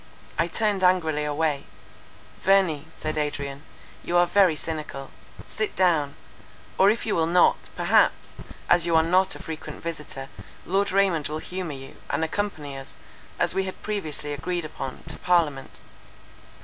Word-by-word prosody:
'" - - -17
I - - -3
turned 200 +2 0
angrily 160 -5 +3
away: 150 -1 0 0.8
"Verney," 180 -6 +3
said 155 0 -2
Adrian, 145 -2 -3 0.4
"you 175 - +1
are 175 - +6
very 180 -2 +4
cynical: 150 -3 -5 0.3
sit 420 -1 -3
down; 160 -6 +2 0.6
or 195 - +7
if 225 +2 0
you 220 - 0
will 160 -1 +2
not, 175 +1 +3
perhaps, - - +3 0.3
as 175 -1 +4
you 170 - +2
are 160 - +6
not 185 +3 +3
a - - -9
frequent 160 -1 -7
visitor, 150 -5 -5 0.4
Lord 195 +3 +1
Raymond 190 -6 +2
will 155 - -3
humour 180 -1 -5
you, 135 0 -11
and - - 0
accompany 160 -5 -3
us, 135 0 -9 0.4
as - - +1
we 190 - 0
had 190 - -7
previously 155 -8 -3
agreed 175 +4 -2
upon, 135 -4 -6
to 160 - -4
parliament." 160 -7 +1
165 Hz, 155 wpm, -25 LUFS, 150-185 Hz, 0.8 s, or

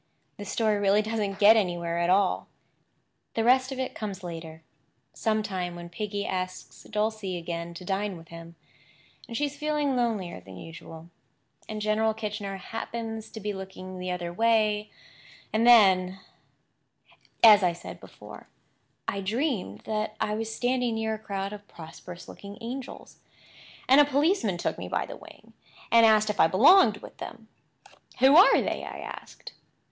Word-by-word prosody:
This 205 -1 -7
story 215 -2 +1
really 205 +1 +3
doesn't 210 -3 -2
get 210 +2 +7
anywhere 175 -5 0
at 170 0 +1
all. 190 0 +2 0.9
The 225 - +1
rest 260 +2 +4
of 265 - -5
it 260 -1 -3
comes 200 -4 -6
later—sometime 175 +3 -5
when 175 0 -9
Piggy 205 +3 -4
asks 185 0 -5
Dulcie 215 -3 -2
again 170 0 -5
to 180 - -9
dine 195 0 -2
with 165 0 -15
him, 165 0 -11 0.7
and 230 -2 -5
she 290 - +1
is 290 0 -5
feeling 295 -2 0
lonelier 220 - -1
than 95 +1 -12
usual, 165 - -11 0.6
and 215 -1 -4
General 215 +1 +1
Kitchener 210 -2 -4
happens 225 +2 -6
to 220 - -9
be 210 0 -3
looking 190 -1 -8
the 180 0 -4
other 175 -1 -4
way; 215 0 +2 0.6
and 225 +2 +2
then— 190 -5 +6 1.2
As 215 -2 +9
I 180 -2 +3
said 170 - -10
before, - - -13 0.6
I 200 - -2
dreamed 210 - -2
that 215 0 -3
I 210 - 0
was 225 +1 -3
standing 245 0 0
near 220 0 -1
a 215 - -5
crowd 200 -1 -4
of 205 -1 -11
prosperous 170 +2 -11
looking 200 0 -10
angels, 250 +3 -8 0.7
and 270 +3 +7
a - - +5
policeman 285 - +1
took - - -3
me - - -5
by - - -1
the - - -8
wing - - -16 0.4
and 230 -1 +7
asked 215 -1 +4
if 210 - -10
I - - +7
belonged 215 - +5
with - - -12
them. 225 -1 -9 0.7
"Who 265 +3 +6
are 370 - +7
they?" - - -3
I - - -7
asked. - - -9
210 Hz, 160 wpm, -27 LUFS, 185-225 Hz, 1.2 s, As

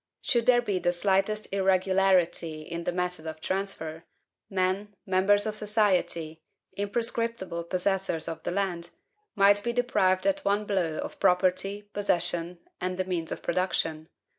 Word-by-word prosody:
Should 235 -3 +1
there 240 -1 +5
be 200 -5 -1
the 175 - +1
slightest 195 +4 +1
irregularity 185 -4 +2
in 170 +2 -6
the - - +1
method 180 -2 -3
of 160 0 -6
transfer, 165 -3 -3 0.5
men, 195 +2 -1
members 195 +1 +3
of 215 -1 -2
society, 190 -7 0 0.3
imprescriptible 205 -4 -1
possessors 185 -2 0
of 165 - -5
the - - -3
land, 175 -2 -2 0.5
might 200 0 +5
be 235 - -1
deprived 190 -7 +2
at 295 0 +1
one 205 +1 +1
blow 180 -6 0
of - - -6
property, 190 +2 +2
possession, 175 -3 0 0.2
and 180 0 -2
the 185 - -1
means 175 -3 -2
of - - -5
production. 165 -3 -1
190 Hz, 140 wpm, -28 LUFS, 175-205 Hz, 0.5 s, there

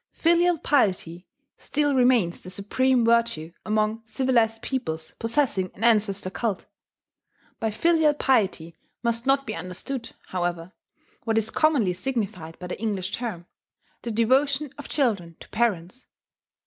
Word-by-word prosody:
Filial 345 +1 +3
piety 185 - 0 0.3
still 290 -1 0
remains 245 -9 +3
the 185 - -8
supreme 240 +6 +1
virtue 230 -9 +2
among 215 +1 0
civilized 225 -1 +1
peoples 160 -12 -4
possessing 230 -5 0
an 210 - -8
ancestor 205 -4 +3
cult.... 210 -2 -2 0.9
By 225 - 0
filial 315 +5 +3
piety 190 - +1 0.3
must 235 +1 -1
not 275 0 +3
be 215 - -4
understood, 185 +9 -5 0.2
however, 175 0 -3 0.5
what 225 -1 0
is 220 0 0
commonly 280 - +2
signified 185 -6 -4
by 180 - -8
the 180 - -6
English 200 -4 -2
term, 215 -9 -4 0.6
the 235 - -5
devotion 265 +5 +2
of 290 - -10
children 200 - 0
to - - -12
parents. 215 -1 -1
225 Hz, 130 wpm, -25 LUFS, 185-260 Hz, 0.9 s, Filial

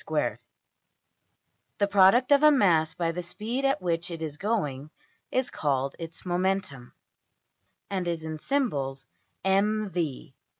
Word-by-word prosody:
\end{DPalign*} - - -1 1.4
The 200 - +3
product 205 +7 +5
of 285 0 +6
a 305 - +8
mass 175 - +3
by 170 -1 0
the 180 +2 -4
speed 220 +9 -4
at 270 -8 +1
which 170 -1 -1
it 170 -2 -6
is 150 -2 -4
going 155 -9 -2 0.4
is 255 -1 0
called 135 -2 -1
its 165 0 -8
\emph{momentum}, 180 -8 -2 1.0
and 185 -3 -2
is 165 -2 -3
in 155 -1 -5
symbols~$mv$. 180 - -2
180 Hz, 125 wpm, -27 LUFS, 155-210 Hz, 1.4 s, a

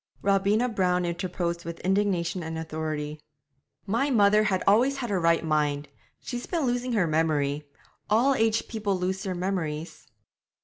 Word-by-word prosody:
Robina 200 +4 +2
Brown 180 -5 +1
interposed 170 0 -3
with 170 0 -6
indignation 190 -2 0
and 160 0 -5
authority. 155 -1 -4 0.6
'My 230 +8 +1
mother 210 -3 +4
has 190 -3 0
always 245 +7 +4
had 240 -5 -3
her 190 - +1
right 165 -1 +2
mind; 150 -2 0 0.3
she's 245 -1 -6
been 335 -5 -1
losing 245 0 -1
her 205 -6 +3
memory. 150 -2 0 0.4
All 240 +6 +4
aged 225 -2 +1
people 210 -4 -1
lose 185 +1 -2
their 190 -3 -3
memories.' 175 -4 -3
185 Hz, 145 wpm, -27 LUFS, 160-215 Hz, 0.6 s, mother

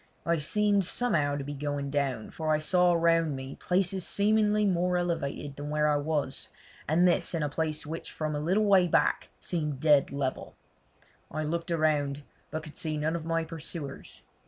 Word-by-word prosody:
I 170 -1 +1
seemed 205 +6 +2
somehow 165 -8 +1
to 145 - -4
be 145 +1 -5
going 145 -1 -3
down, 140 -6 -1
for 155 -1 -2
I 155 - +4
saw 180 +3 +3
round 165 -3 +2
me 130 +1 -6
places 185 0 +1
seemingly 210 +1 +2
more 180 -1 +1
elevated 150 -5 -2
than 145 +1 -6
where 150 0 +1
I 150 -1 +3
was, 145 -2 -1 0.4
and 170 +4 +4
this 175 0 +1
in 160 - -1
a 145 - 0
place 155 0 -2
which 160 +2 -6
from 155 -1 -3
a 145 - -2
little 185 +8 +1
way 190 -3 +5
back - - +1
seemed 150 -6 -3
dead 145 -2 +4
level. 140 -2 -3 0.7
I 155 - -3
looked 170 +3 -3
around, 150 -3 +1 0.3
but 155 0 -4
could 155 -2 -10
see 155 -2 -1
none 155 +2 -1
of 165 -2 -4
my 165 0 0
pursuers. 160 -3 -7
155 Hz, 180 wpm, -29 LUFS, 145-175 Hz, 0.7 s, way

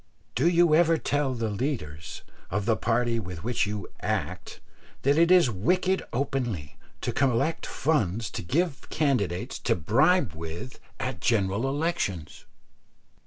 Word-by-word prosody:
Do - - +2
you 170 -2 +4
ever 165 0 +5
tell 145 -4 0
the 115 -2 -2
leaders 100 - -4 0.3
of 105 -1 -1
the 115 -1 +3
party 120 0 +1
with 90 -5 -7
which 120 -2 0
you 105 -3 -4
"act" 95 -4 -3 0.4
that 140 +2 +4
it 165 +2 +4
is 180 -9 +6
wicked 185 - +1
openly 120 - -2 0.3
to - - -1
collect 135 +4 +1
funds 115 - 0
to - - -4
give 155 - -1
candidates 110 - 0
to - - +1
bribe 135 - +3
with 85 +10 -7 0.2
at - - -3
general 105 +3 +1
elections? 140 - -2
120 Hz, 135 wpm, -27 LUFS, 95-150 Hz, 0.4 s, is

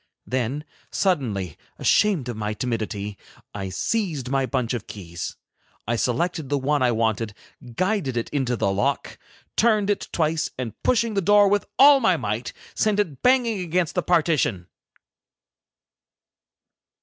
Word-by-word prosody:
Then, 130 +3 -2 0.3
suddenly, 110 - -1 0.2
ashamed 195 - +2
of 120 - -4
my 105 0 -3
timidity, 105 -4 -3 0.3
I 100 -2 -4
seized 155 - -2
my 135 -1 +1
bunch 125 -3 -1
of 120 -4 -4
keys. 85 -4 -6 0.5
I 120 - +1
selected 145 +6 -1
the 145 - +1
one 145 +1 0
I 125 -1 +3
wanted, 110 -2 0 0.4
guided 185 - 0
it 115 - -1
into 130 -4 0
the 100 -3 0
lock, 100 +1 -1 0.4
turned 215 -3 +3
it 205 - -2
twice, 160 -1 0
and 125 -4 -4
pushing 235 -2 +2
the 200 - +1
door 205 +2 +5
with 205 0 +1
all 280 0 +8
my 190 -9 +3
might, 115 -1 -3 0.2
sent 210 -1 +1
it 155 -11 -1
banging 245 -5 +3
against 175 -1 0
the 180 - +1
partition. 155 - +1
135 Hz, 140 wpm, -24 LUFS, 115-190 Hz, 0.5 s, all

